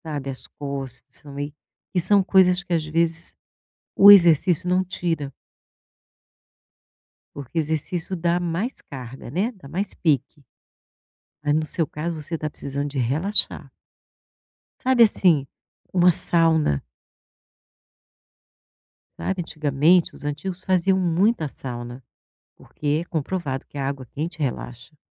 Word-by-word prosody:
Sabe, 145 -4 -6
as 130 - -9
costas, 135 -2 -5
né, 145 0 -7 0.4
e 180 - +1
são 195 +3 +3
coisas 185 -1 +3
que 185 -2 -5
às 165 -2 0
vezes 165 +1 -1 0.6
o 200 - +8
exercício 175 -3 +5
não 180 +1 +2
tira. 165 -6 -4 2.0
Porque 140 +3 -9
exercício 160 +4 -3
dá 170 0 0
mais 175 +8 -4
carga, 130 -2 -10
né, 195 - -1
dá 185 -10 -15
mais 190 +7 -4
pique. 150 -1 -2 1.0
Ah, 145 0 0
no 155 +1 0
seu 160 +1 +1
caso, 155 +3 -5
você 160 +2 -5
tá 155 - -4
precisando 140 -1 -4
de 140 -1 -6
relaxar. 150 - +2 1.1
Sabe, 255 -2 +4
assim, 175 -9 +3 0.5
uma 180 -1 +4
sauna. 160 - +7 2.3
Sabe, 190 -2 -3
antigamente 155 +2 +1
os - - -8
antigos 175 +6 -5
faziam 190 +1 +1
muita 180 0 +1
sauna, 120 -1 -8 0.5
porque 150 +2 -4
comprovado 155 -4 -4
que - - -12
a 135 -1 -2
água 135 -2 -5
quente 155 +6 -7
relaxa. 130 +1 -6
160 Hz, 120 wpm, -22 LUFS, 140-180 Hz, 2.3 s, o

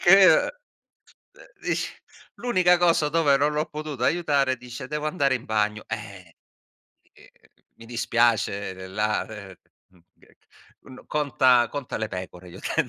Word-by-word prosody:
che, 195 +2 +8
uh - - +5 0.9
uh, - - -8
ish - - -1 0.4
l'unica 185 -7 +3
cosa 170 -3 +3
dove 150 -3 +3
non 145 +2 +1
l'ho 150 +1 -1
potuta 150 -5 -5
aiutare, 140 -5 +1
dice: 125 +2 -9
“Devo 150 +1 -3
andare 140 -5 +1
in 125 - -4
bagno”. 105 0 -1
Eh, 100 -6 -8 0.8
ehm, - - -19 0.5
mi 115 - -14
dispiace, 115 -4 0
la 105 +1 -1
uhm, 100 -3 -9 0.4
mhmm, 90 -2 -25 0.8
uhm, 130 - -15
n 130 - -14
conta 130 -5 +3
conta 140 -3 -5
le 110 - -2
pecore, 90 -1 -8
gli - - -12
ho - - -11
detto. - - -1
130 Hz, 150 wpm, -25 LUFS, 105-150 Hz, 0.9 s, che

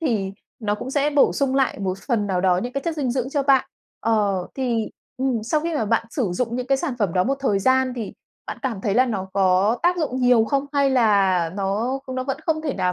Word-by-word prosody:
thì 215 -11 -1 0.3
nó 210 -3 -1
cũng 255 - -6
sẽ 290 +1 +1
bổ 285 -1 +4
sung 270 -1 0
lại 265 -6 +1
một 190 -1 -2
phần 220 -2 -1
nào 185 -2 0
đó 180 -1 +3
những 245 +1 -4
cái 275 - -3
chất 330 -1 -2
dinh 270 -5 -1
dưỡng 260 +1 -2
cho 285 -1 0
bạn. 270 -1 +4 0.4
Ờ, 205 -5 +1
thì 240 -4 -1 0.3
ừm, 255 -4 -1
sau 300 +7 0
khi 335 0 -3
mà 225 - 0
bạn 230 +1 0
sử 225 - -1
dụng 235 +5 -2
những 250 0 -3
cái 270 0 +2
sản 295 -5 -2
phẩm 200 -6 0
đó 180 0 +2
một 275 - +1
thời 210 -8 +1
gian 260 +4 +2
thì 225 -4 -5 0.3
bạn - - -6
cảm 230 -7 -2
thấy 200 -1 -1
là 255 +3 +4
nó 190 -5 -3
có 195 +4 +3
tác 355 +1 +3
dụng 260 -5 -2
nhiều 245 -3 +5
không 275 +4 -1
hay 280 -1 +2
là 200 -8 +3
nó 210 +7 -1 0.2
nó 255 0 -2
vẫn 270 0 -2
không 315 -1 0
thể 290 -4 -2
nào 180 0 0
245 Hz, 250 wpm, -22 LUFS, 200-270 Hz, 0.4 s, nhiều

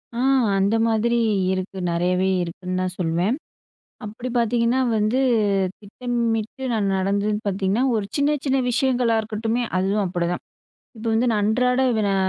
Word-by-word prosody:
அ. - - -3 0.4
அந்த 200 +3 +2
மாதிரி 230 +2 +1 0.4
இருக்கு. 190 +1 -4
நெறையவே 180 +2 +1
இருக்குன்னு 180 +2 -4
தான் 185 0 -3
சொல்லுவேன். 175 +7 +1 0.7
அப்டி 220 +4 -6
பாத்தீங்கன்னா 235 +2 +2 0.2
வந்து, 215 +5 +1 0.6
திட்டமிட்டு 235 +2 -3
நான் 210 -3 0
நடந்ததுன்னு 200 +3 0
பாத்தீங்கன்னா, 195 +4 0
ஒரு 210 - -1
சின்ன, 295 +1 +2
சின்ன 270 -1 +1
விஷயங்களா 245 -1 +1
இருக்கட்டுமே 225 +2 -2 0.2
அதுவும் 195 +3 +1
அப்டிதான். 175 0 -2 0.5
இப்ப 225 +1 -7
வந்து, 230 +3 +2
நான் 210 -2 +1
அன்றாட, 250 +4 +2 0.3
அ, - - +1
215 Hz, 130 wpm, -22 LUFS, 190-235 Hz, 0.7 s, அந்த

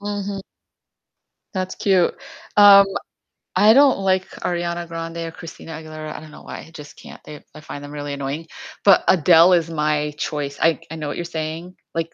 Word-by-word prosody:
Mhm. 205 -1 -4 1.1
That's 185 -2 -3
cute. 190 -3 +2 0.4
Um, 200 -1 +8 0.7
I 215 +1 +6
don't 275 -2 +5
like 190 -1 0
Ariana 175 0 -3
Grande 165 0 -6
or 165 0 -5
Christina 165 0 -11
Aguilera, 155 -1 -8
I - - -6
don't 155 0 -13
know - - -14
why, - - -8
I - - -17
just 150 -2 -11
can't, - - -13
they 150 -1 -11
I - - -11
find 145 -2 -9
them 145 - -9
really 145 -1 -5
annoying, 140 +3 -5 0.4
but 195 -2 +6
Adele 170 +1 +6
is 170 -2 +2
my 150 -1 -1
choice, 145 -2 -4
I 165 0 +3
c - - -21
I - - -5
know 155 -2 -5
what 145 - -5
you're 175 - -4
saying, 165 +2 -6 0.2
like, 165 0 -3
165 Hz, 190 wpm, -21 LUFS, 155-185 Hz, 1.1 s, Um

